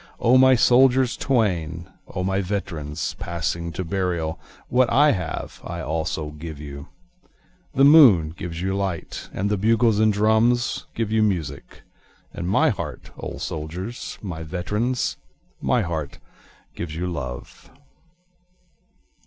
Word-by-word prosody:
O 120 Hz, +2 st, +4 dB
my 130 Hz, 0 st, +7 dB
soldiers 125 Hz, +1 st, +4 dB
twain! 90 Hz, -, 0 dB, 0.3 s
O 90 Hz, -, -1 dB
my 95 Hz, +1 st, 0 dB
veterans 85 Hz, -6 st, -3 dB
passing 85 Hz, 0 st, -3 dB
to 95 Hz, -, -3 dB
burial! 85 Hz, -3 st, -2 dB, 0.3 s
What 125 Hz, -1 st, +3 dB
I 145 Hz, +5 st, +5 dB
have 90 Hz, -7 st, -4 dB
I -, -, -5 dB
also 80 Hz, -1 st, -3 dB
give 75 Hz, 0 st, -8 dB
you. 70 Hz, -1 st, -8 dB, 0.9 s
The 135 Hz, -, +4 dB
moon 130 Hz, -, +7 dB
gives 85 Hz, 0 st, -6 dB
you 95 Hz, 0 st, 0 dB
light, 95 Hz, -4 st, -4 dB
And 95 Hz, -, -2 dB
the 105 Hz, 0 st, 0 dB
bugles 110 Hz, +1 st, +3 dB
and 110 Hz, 0 st, +4 dB
the 100 Hz, -, -4 dB
drums 110 Hz, +3 st, +2 dB
give 110 Hz, -2 st, -2 dB
you 110 Hz, 0 st, +3 dB
music, 85 Hz, -10 st, -2 dB, 0.5 s
And 85 Hz, +1 st, -4 dB
my 100 Hz, -, +4 dB
heart, -, -, -5 dB
O -, -, -5 dB
my -, -, -8 dB
soldiers, 90 Hz, +9 st, -5 dB
my 90 Hz, -5 st, -5 dB
veterans, 105 Hz, +10 st, -2 dB, 0.4 s
My 120 Hz, -, +2 dB
heart 80 Hz, -5 st, -4 dB, 0.6 s
gives 80 Hz, -2 st, -6 dB
you 85 Hz, +2 st, -2 dB
love. 65 Hz, -8 st, -6 dB
95 Hz, 135 wpm, -23 LUFS, 80-115 Hz, 0.9 s, my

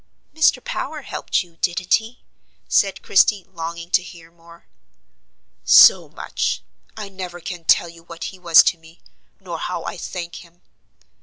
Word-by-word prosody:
"Mr. 315 Hz, +1 st, +2 dB
Power -, -, -5 dB
helped -, -, -2 dB
you: 170 Hz, -2 st, -23 dB
didn't 180 Hz, +1 st, -1 dB
he?" 225 Hz, +2 st, -1 dB, 0.4 s
said 195 Hz, -2 st, +1 dB
Christie, 195 Hz, 0 st, +3 dB
longing 170 Hz, -1 st, -8 dB
to 185 Hz, -, +4 dB
hear 170 Hz, -2 st, -14 dB
more. 170 Hz, 0 st, -19 dB, 1.0 s
"So -, -, +7 dB
much! -, -, -3 dB, 0.3 s
I 215 Hz, -2 st, -6 dB
never 185 Hz, -2 st, -8 dB
can 175 Hz, -1 st, -8 dB
tell 170 Hz, -, +4 dB
you 165 Hz, 0 st, -14 dB
what 170 Hz, 0 st, -10 dB
he 185 Hz, -, -15 dB
was 170 Hz, -2 st, +6 dB
to 170 Hz, -, 0 dB
me, 165 Hz, +1 st, -19 dB, 0.4 s
nor 175 Hz, -4 st, -7 dB
how 175 Hz, -2 st, -4 dB
I -, -, -6 dB
thank 175 Hz, 0 st, -7 dB
him. 175 Hz, 0 st, -17 dB
175 Hz, 155 wpm, -20 LUFS, 170-185 Hz, 1.0 s, So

